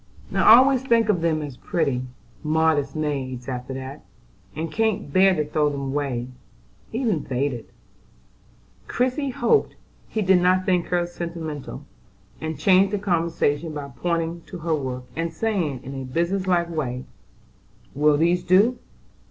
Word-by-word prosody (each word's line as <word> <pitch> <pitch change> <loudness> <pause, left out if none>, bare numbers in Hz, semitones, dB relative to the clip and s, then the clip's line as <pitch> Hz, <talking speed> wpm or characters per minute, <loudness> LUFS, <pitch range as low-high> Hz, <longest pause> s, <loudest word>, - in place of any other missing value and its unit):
"I 225 - +8
always 260 +1 +5
think 230 -4 +2
of 180 -5 +2
them 160 -2 +1
as 140 -4 -7
pretty, 140 -7 -1 0.4
modest 155 -2 +1
maids 135 -5 -3
after 125 0 -5
that, 135 0 -7 0.5
and 160 +2 -4
can't 220 -10 -1
bear 190 0 +5
to 150 -2 0
throw 150 0 +1
them 140 -1 -4
away, 135 -4 -2 0.7
even 230 -5 0
when - - -6
faded." 130 -2 -2 1.2
Christie 260 +3 0
hoped 250 - +1 0.3
he 220 - -2
did 185 -1 +4
not 185 +1 +3
think 180 -2 +1
her 175 -1 +1
sentimental, 170 -4 -6 0.6
and 160 -1 -4
changed 190 +5 +4
the 205 - 0
conversation 165 -5 0
by 140 -1 -6
pointing 170 -1 -2
to 185 - -7
her 165 -1 -1
work, 130 -4 -3
and 165 0 -2
saying, 165 - -2
in 135 - -7
a 135 -1 -5
business 170 +8 -1
like 175 -2 +2
way: 130 -6 -3 0.9
"Will 150 +1 +3
these 170 +3 +2
do? 200 +8 +4
165 Hz, 150 wpm, -23 LUFS, 145-185 Hz, 1.2 s, I